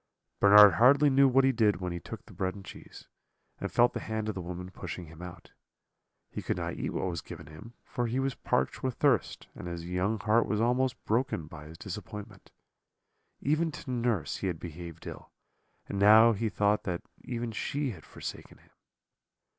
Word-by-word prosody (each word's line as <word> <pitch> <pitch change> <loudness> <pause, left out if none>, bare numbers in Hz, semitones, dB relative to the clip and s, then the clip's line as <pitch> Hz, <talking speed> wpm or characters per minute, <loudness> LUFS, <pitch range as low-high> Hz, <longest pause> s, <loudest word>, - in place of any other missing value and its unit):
"Bernard 105 -1 +9
hardly 140 +4 +6
knew 135 +1 +6
what 135 +1 +4
he 135 - +4
did 105 -6 +2
when 90 -1 -3
he 85 - -4
took - - -9
the - - -15
bread 95 0 -2
and 100 -1 -11
cheese, - - -12 0.5
and - - -4
felt 120 +1 +4
the - - -3
hand 110 -1 -3
of 110 - -1
the 95 - -5
woman 90 +1 -7
pushing 90 -1 -7
him 80 +1 -13
out. 90 -2 -10 0.8
He - - -5
could - - -2
not - - -3
eat - - -3
what - - -2
was 85 -5 -3
given - - -10
him, 90 +11 -12
for 120 -1 -3
he 120 +3 -1
was 135 0 0
parched 65 - -1
with 130 -2 -2
thirst, 135 -7 +1
and - - -8
his 85 -1 -5
young 90 +5 -1
heart 110 +3 +2
was 105 - 0
almost 125 +2 0
broken 115 - 0
by 75 -1 -11
his 80 +1 -11
disappointment. 105 +2 -8 0.9
Even 155 +4 +1
to 145 -3 -7
nurse 115 - -1
he - - -3
had 85 -4 -3
behaved 85 -1 -9
ill, - - -9 0.6
and 100 - -4
now 110 +3 +8
he 110 +1 -1
thought 105 +1 +1
that 90 -4 -3 0.2
even 120 -2 -4
she 140 +4 -2
had 85 -8 -11
forsaken - - -8
him. - - -26
105 Hz, 195 wpm, -29 LUFS, 90-120 Hz, 0.9 s, Bernard